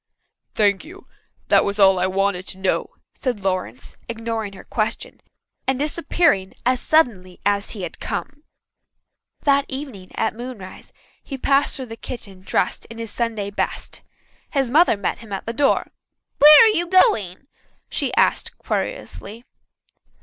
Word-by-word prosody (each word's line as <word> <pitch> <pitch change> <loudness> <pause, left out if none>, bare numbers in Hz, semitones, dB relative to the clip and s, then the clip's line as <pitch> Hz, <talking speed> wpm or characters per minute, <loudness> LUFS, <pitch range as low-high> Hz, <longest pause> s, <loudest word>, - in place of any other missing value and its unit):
"Thank 205 -2 +3
you. 370 +5 -13 0.4
That - - +5
was 200 0 -2
all 190 -2 +6
I 185 - +2
wanted 190 -1 0
to - - -5
know," 190 0 0 0.2
said 245 -7 -3
Lawrence, 185 - -3
ignoring 225 -3 -3
her 195 - -11
question, - - -3 0.5
and 265 -1 +1
disappearing 295 - +1
as 255 0 +2
suddenly 205 - +1
as 200 0 +1
he 190 - -5
had 170 - -6
come. 290 +1 -5 1.0
That 280 -1 +3
evening 265 -9 -7
at 220 - 0
moonrise 230 -5 -9 0.3
he 270 - -7
passed 275 +2 +2
through 265 - -5
the 225 -2 -8
kitchen 200 -8 -8
dressed 190 - -1
in 230 - -11
his 230 -2 -5
Sunday 220 -4 -2
best. - - -3 0.5
His 270 -4 0
mother 310 -5 +5
met 200 - -2
him 225 -3 -13
at 195 - -4
the 230 - -3
door. 275 +3 +1 0.5
"Where 300 +6 +10
are 450 - +6
you 345 +1 +1
going?" 230 - +3 0.4
she - - -1
asked - - +2
querulously. 225 +5 -5
225 Hz, 150 wpm, -22 LUFS, 195-275 Hz, 1.0 s, Where